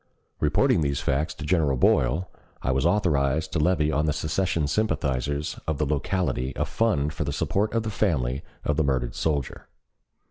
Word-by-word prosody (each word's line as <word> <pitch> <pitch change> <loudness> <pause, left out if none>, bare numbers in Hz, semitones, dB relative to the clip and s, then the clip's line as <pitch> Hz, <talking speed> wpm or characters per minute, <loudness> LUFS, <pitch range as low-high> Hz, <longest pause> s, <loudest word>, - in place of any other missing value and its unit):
Reporting - - +3
these 70 -2 0
facts 70 +3 0
to 80 - -7
General 75 -5 +2
Boyle, 65 +9 +2 0.4
I 65 - +1
was 65 +4 +2
authorized 80 -5 +1
to 85 - +1
levy 75 -1 +2
on 75 +1 +1
the 75 - +2
secession 80 +1 0
sympathizers 70 - -1
of 80 -2 0
the 75 - 0
locality 70 -2 -1
a - - 0
fund 75 -10 0
for - - -2
the - - -3
support 105 +2 0
of 115 - +1
the 110 - -3
family 70 - 0 0.2
of 75 - 0
the 80 - +3
murdered 65 -4 0
soldier. 75 -5 -2
75 Hz, 175 wpm, -25 LUFS, 70-85 Hz, 0.4 s, Reporting